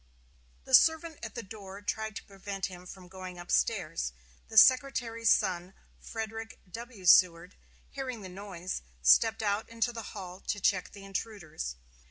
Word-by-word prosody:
The - - -10
servant 320 0 +5
at 225 -2 -6
the 235 - -4
door 200 -1 -9
tried 220 +1 -3
to - - -6
prevent 195 0 -5
him 180 -1 -9
from 185 0 -11
going 185 -1 -9
up 175 0 -8
stairs; 60 +1 0 0.3
the 220 - -6
Secretary's 240 -2 +5
son, 185 -2 +2 0.2
Frederick 225 0 -6
W. 230 -3 -9
Seward, 175 +1 +6 0.4
hearing 255 -5 -5
the - - -6
noise, 185 -1 -6 0.2
stepped 225 - +5
out 205 +1 0
into 230 +1 0
the 230 - -5 0.2
hall 185 -1 -7
to 205 - -3
check 185 -1 +1
the 200 -1 -11
intruders. 190 - -5
200 Hz, 155 wpm, -30 LUFS, 185-225 Hz, 0.4 s, Seward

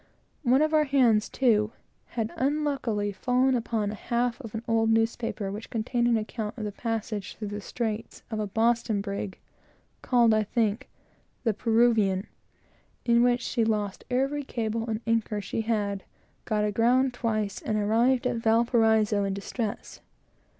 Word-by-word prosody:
One 265 +1 +4
of 310 0 0
our 305 -1 +4
hands, 245 -6 +3
too, 220 -4 +2 0.4
had 225 -1 -1
unluckily 270 -7 0
fallen 250 +6 +1
upon 225 -4 -1
a - - -5
half 240 +4 -1
of 225 -4 -8
an 225 - -4
old 225 -1 +2
newspaper 225 -2 0
which 210 +3 -7
contained 235 +2 0
an 235 -1 +3
account 215 0 -4
of 220 - -4
the 210 - -3
passage, 220 -2 -4
through 210 -2 -5
the 205 0 -5
straits, 225 +1 -4
of 220 - -2
a 210 - -1
Boston 225 0 +1
brig, 200 -1 -4 0.6
called, 235 -3 +4
I 215 - +3
think, 220 +3 -1 0.5
the 225 - +2
Peruvian, 220 -3 +2 0.8
in 235 0 +4
which 245 0 +3
she 235 - 0
lost 210 -3 -1
every 270 +3 0
cable 225 -2 -3
and 220 0 -2
anchor 225 -2 0
she 205 +2 -3
had, 205 -3 -1 0.4
got 210 -2 +1
aground 245 +5 +2
twice, 215 -4 -2
and 215 - -1
arrived 230 +5 +2
at 245 -1 0
Valparaiso 225 -2 +3
in 195 -1 -1
distress. 205 +2 -5
225 Hz, 155 wpm, -27 LUFS, 210-240 Hz, 0.8 s, One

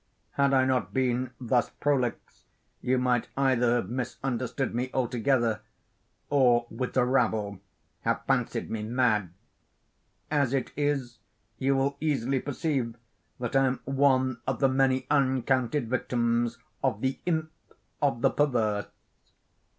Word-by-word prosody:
Had 140 -1 +2
I 130 -1 +4
not 130 0 0
been 130 -1 +1
thus 120 -2 +1
prolix, 135 -5 -2 0.4
you 130 +1 +1
might 125 -1 +1
either 125 -3 +3
have 115 -6 -1
misunderstood 130 +1 -2
me 125 +2 -1
altogether, 120 -2 +1 0.7
or, 125 -4 +4
with 125 +3 -3
the 125 -2 +3
rabble, 110 -6 +1 0.4
have - - -1
fancied - - 0
me 110 - -2
mad. 110 -4 +1 1.0
As 140 -3 +2
it 135 - -2
is, 140 -5 -1 0.4
you 135 +1 +2
will 140 +1 0
easily 135 -4 +1
perceive 135 -4 -2 0.4
that 125 +2 -3
I 135 0 +5
am 130 0 -2
one 130 -2 +2
of 130 -2 -1
the 135 - +4
many 130 -1 +2
uncounted 130 -1 +1
victims 120 -1 0 0.3
of 120 -6 0
the 130 0 -1
Imp 160 -2 0 0.5
of 135 -5 +1
the - - +5
Perverse. 115 -8 +1
130 Hz, 130 wpm, -28 LUFS, 120-135 Hz, 1.0 s, I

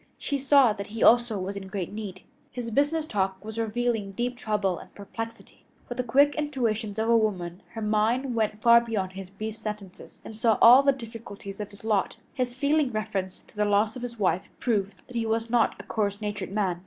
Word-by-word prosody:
She 285 -1 -2
saw 270 -4 +5
that 200 -1 -6
he 225 +1 -3
also 235 -2 +5
was 190 +1 -4
in 195 -1 -6
great 190 -1 -4
need. 200 -3 -7 0.3
His 240 -2 -5
business 290 +6 +1
talk 190 -5 -2
was 220 +1 -5
revealing 225 -2 -1
deep 245 +4 -2
trouble 205 -6 -1
and - - -13
perplexity. 225 +3 -8 0.2
With 245 +1 -6
the - - +2
quick 280 +5 +4
intuitions 230 -8 -1
of 220 +1 0
a 235 - +5
woman, 185 -5 0
her 225 - -5
mind 225 +5 +1
went 215 -2 -1
far 235 0 +8
beyond 205 -5 -3
his 190 -1 -8
brief 215 +2 -6
sentences 210 -4 -8
and 220 - -8
saw 225 -1 +2
all 245 +4 +9
the 280 0 +4
difficulties 225 -5 -8
of 205 -1 -4
his 200 - -14
lot. 215 -3 0 0.2
His 250 -1 -2
feeling 285 0 +2
reference 210 -4 -3
to - - -24
the 210 - +1
loss 210 +1 +2
of 250 - -7
his 240 -1 -6
wife 185 -3 0
proved 205 -5 0
that 250 - -13
he 230 -1 0
was 225 +1 -1
not 240 -2 +3
a - - -7
coarse 205 -2 -1
natured 210 -2 -4
man. 195 -4 0
220 Hz, 210 wpm, -27 LUFS, 200-240 Hz, 0.3 s, all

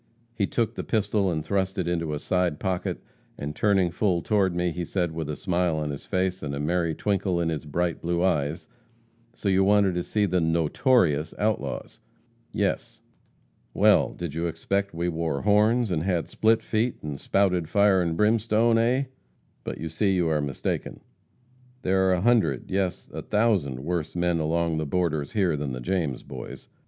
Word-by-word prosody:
He 105 -4 0
took 115 -2 -1
the - - -5
pistol 105 -3 +1
and 80 -2 -3
thrust 95 0 -1
it 90 -3 -1
into 85 -3 -1
a - - -2
side 90 0 0
pocket, 95 -2 -2 0.3
and 75 +1 -5
turning 95 -3 +2
full 90 -1 0
toward 100 -5 +1
me, 90 0 0
he 90 +2 -4
said 85 0 -1
with 80 -2 -4
a 75 - -2
smile 90 -3 0
on 75 -1 -2
his 70 - -8
face, 95 -1 -1
and 70 -2 -4
a - - -4
merry 85 +1 0
twinkle 95 -2 0
in 85 -1 0
his 80 -1 -3
bright 85 +3 -1
blue 85 +1 0
eyes: 75 -3 0 0.7
'So - - -4
you 95 0 +4
wanted 100 -1 +4
to 90 - -1
see 105 +4 0
the 90 -2 +1
notorious 80 - +2
outlaws?' 105 -11 -2 0.5
'Yes.' - - -2 0.8
'Well, - - +4
did 85 -4 -5
you 85 +2 -1
expect 100 +4 -2
we 85 +1 -1
wore 80 -4 -2
horns, 105 +2 +3
and 80 -3 0
had 90 -1 -1
split 110 0 +2
feet, 115 +3 0
and 75 -2 -5
spouted 90 -5 +1
fire 100 +1 +4
and 85 -2 -1
brimstone, 115 +1 +3
eh? 125 +4 +2 0.6
But - - -5
you 80 - -5
see 95 +5 +1
you 85 -3 +1
are 75 -2 +1
mistaken. 70 -3 -3 0.8
There 95 0 +2
are - - +4
a 90 - 0
hundred, 105 - +2
yes, 95 -1 -1
a - - -4
thousand, 100 - +1
worse 85 +1 -3
men 85 -1 +1
along 80 +1 0
the 80 - -2
borders 80 -3 -1
here 95 -7 +2
than 70 -2 -3
the 65 - -4
James 75 -1 -2
Boys. 65 -3 -9
90 Hz, 185 wpm, -26 LUFS, 80-100 Hz, 0.8 s, you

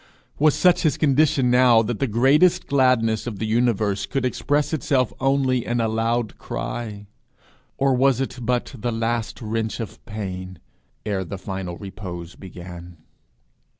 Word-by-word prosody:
Was 155 0 +4
such 180 -1 +4
his 155 -4 +1
condition 140 -3 +3
now 125 -2 +5
that 115 -1 -3
the 135 - +1
greatest 145 - +3
gladness 125 -5 +2
of 110 -4 -4
the 110 - -3
universe 110 -3 +1
could 130 +5 -1
express 145 +4 0
itself 130 -7 +1
only 135 -2 +1
in 120 0 -1
a 115 - +1
loud 115 0 -1
cry? 105 -4 -5 0.7
Or 135 0 +2
was 130 0 +3
it 130 -1 -3
but 125 +3 -1
the 120 0 -3
last 115 0 -2
wrench 110 +1 -2
of 110 -3 -7
pain 95 -4 -6 0.5
ere 100 -3 -1
the 95 +2 -6
final 95 -2 -5
repose 90 -3 -8
began? 90 -2 -10
115 Hz, 150 wpm, -23 LUFS, 100-130 Hz, 0.7 s, now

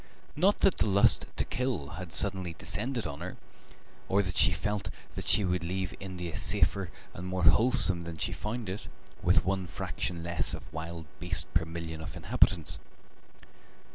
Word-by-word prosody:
Not 190 +7 +2
that 190 - +3
the - - +2
lust 100 +1 +5
to - - 0
kill 120 - -2
had 90 -1 -7
suddenly 95 0 +2
descended 115 - -1
on 70 - -5
her, 90 +1 -6 0.7
or 100 +1 +3
that 90 -2 -4
she 100 +2 +5
felt 105 +2 -2 0.2
that - - -5
she 105 - +4
would 90 -1 -1
leave 90 +1 -3
India 90 -5 -6
safer 95 -3 +1 0.2
and 90 +2 -7
more 90 -1 -2
wholesome 100 0 +6
than 85 -1 -7
she - - -1
had - - -7
found 110 +1 -4
it, 95 +3 -5 0.3
with 85 -1 +3
one 95 -1 -1
fraction 90 -2 -4
less 85 -5 -1
of 75 - -12
wild 80 0 -6
beast 90 -1 +1
per 85 -1 +2
million 80 -1 -6
of 80 - -7
inhabitants. - - +1
90 Hz, 170 wpm, -30 LUFS, 85-100 Hz, 0.7 s, wholesome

